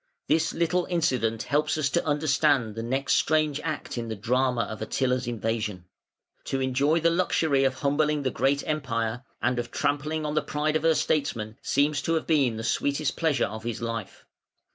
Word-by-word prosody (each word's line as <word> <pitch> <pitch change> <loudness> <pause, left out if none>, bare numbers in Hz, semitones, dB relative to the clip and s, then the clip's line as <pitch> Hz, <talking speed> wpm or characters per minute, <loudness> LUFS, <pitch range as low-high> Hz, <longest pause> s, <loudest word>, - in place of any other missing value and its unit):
This 160 +1 +2
little 170 +1 0
incident 125 - 0
helps 150 +2 +1
us 155 -3 +1
to 170 - +1
understand 145 -5 +2
the 115 - -5
next 130 +4 +1
strange 155 -2 +1
act 145 -4 -4
in 115 - -4
the 110 - -4
drama 125 +3 +1
of 110 +1 -7
Attila's 125 +2 0
invasion. 110 -5 -2 0.6
To 135 - -1
enjoy 135 +5 +2
the 165 +1 +3
luxury 160 -5 +2
of 135 -1 +1
humbling 150 +1 +1
the 130 - 0
great 140 +1 +1
Empire, 120 -6 -1 0.2
and 125 - +1
of 120 0 -4
trampling 150 +4 -1
on 150 - -2
the 155 - +2
pride 150 +1 -1
of 155 - +2
her 165 0 +3
statesmen, 115 -8 -1
seems 145 0 +1
to 165 +2 0
have 160 - -1
been 135 -8 +2
the 110 - -5
sweetest 140 +4 0
pleasure 160 -4 +1
of 110 +1 -7
his 115 -2 -3
life. 115 -4 -5
140 Hz, 185 wpm, -26 LUFS, 115-155 Hz, 0.6 s, the